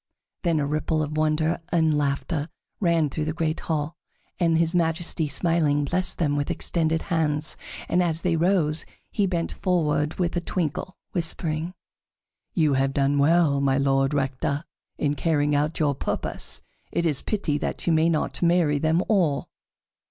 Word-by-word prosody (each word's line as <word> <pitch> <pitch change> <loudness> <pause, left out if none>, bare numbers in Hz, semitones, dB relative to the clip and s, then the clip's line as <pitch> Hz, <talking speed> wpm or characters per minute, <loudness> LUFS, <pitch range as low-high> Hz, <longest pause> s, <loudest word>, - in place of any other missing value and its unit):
Then 165 -3 +1
a 145 - 0
ripple 155 +2 0
of 150 0 -4
wonder 155 +2 +1
and 165 -3 +2
of - - +2
laughter 145 +2 -1 0.3
ran 170 -5 +2
through 155 +1 -2
the 155 - -2
great 160 -1 -1
hall, 155 0 -2 0.4
and 165 -2 +3
his 165 +1 +2
Majesty, 165 -1 +1
smiling, 150 -2 +1
blessed 180 +5 0
them 145 -4 +1
with 145 0 -1
extended 160 -1 0
hands, 155 -2 -1 0.3
and 180 - +2
as 165 -2 0
they 175 -2 +2
rose, 165 -2 +2 0.3
he 205 -3 +1
bent 170 -2 -1
forward 155 -4 0
with 175 -2 -1
a 175 - 0
twinkle, 175 +1 -3
whispering: 165 0 -1 0.8
"You 155 -4 +3
have 135 0 +1
done 140 0 +2
well, 150 -1 +3
My 135 -1 +2
Lord 135 0 +2
Rector, 140 +2 -1 0.3
in 145 -1 0
carrying 150 -1 +1
out 150 +2 0
your 150 -3 +2
purpose. 130 - -3 0.3
It 170 - 0
is 150 -5 +1
pity 170 -9 -1
that - - -3
you 170 - +3
may 160 +1 +3
not 160 -2 -1
marry 170 -4 +3
them 160 +4 +2
all." 170 -10 +1
155 Hz, 165 wpm, -25 LUFS, 145-170 Hz, 0.8 s, and